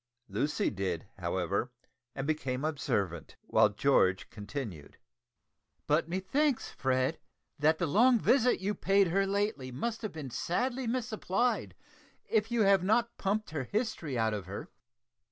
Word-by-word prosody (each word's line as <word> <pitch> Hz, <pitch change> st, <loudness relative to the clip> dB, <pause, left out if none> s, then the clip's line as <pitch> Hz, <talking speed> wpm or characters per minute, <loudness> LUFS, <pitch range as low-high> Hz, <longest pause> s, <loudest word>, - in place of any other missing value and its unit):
Lucy 150 Hz, +1 st, 0 dB
did, 95 Hz, -4 st, -3 dB
however, 95 Hz, +6 st, -1 dB, 0.5 s
and 135 Hz, -, -3 dB
became 140 Hz, -3 st, -1 dB
observant, 105 Hz, -, -2 dB
while -, -, +4 dB
George 90 Hz, 0 st, +2 dB
continued 105 Hz, -, -7 dB, 0.9 s
"But 155 Hz, +2 st, +2 dB
methinks, 225 Hz, -, 0 dB
Fred, 130 Hz, +3 st, 0 dB, 0.4 s
that 155 Hz, +2 st, +4 dB
the 175 Hz, -, 0 dB
long 235 Hz, -, +5 dB
visit 250 Hz, +2 st, +3 dB
you 195 Hz, +2 st, -1 dB
paid 195 Hz, -2 st, +3 dB
her 195 Hz, +3 st, +2 dB
lately 200 Hz, -10 st, -1 dB
must 220 Hz, -, -3 dB
have 215 Hz, -4 st, -3 dB
been 145 Hz, -5 st, -6 dB
sadly 245 Hz, -, -1 dB
misapplied 230 Hz, -1 st, -1 dB, 0.5 s
if 220 Hz, -1 st, +1 dB
you 235 Hz, -1 st, +2 dB
have 195 Hz, -2 st, +5 dB
not 230 Hz, +4 st, +2 dB
pumped 210 Hz, 0 st, -1 dB
her 145 Hz, -4 st, -3 dB
history 170 Hz, -, -2 dB
out 110 Hz, -1 st, +1 dB
of 100 Hz, -3 st, -4 dB
her." 100 Hz, -, -7 dB
165 Hz, 135 wpm, -31 LUFS, -, 0.9 s, long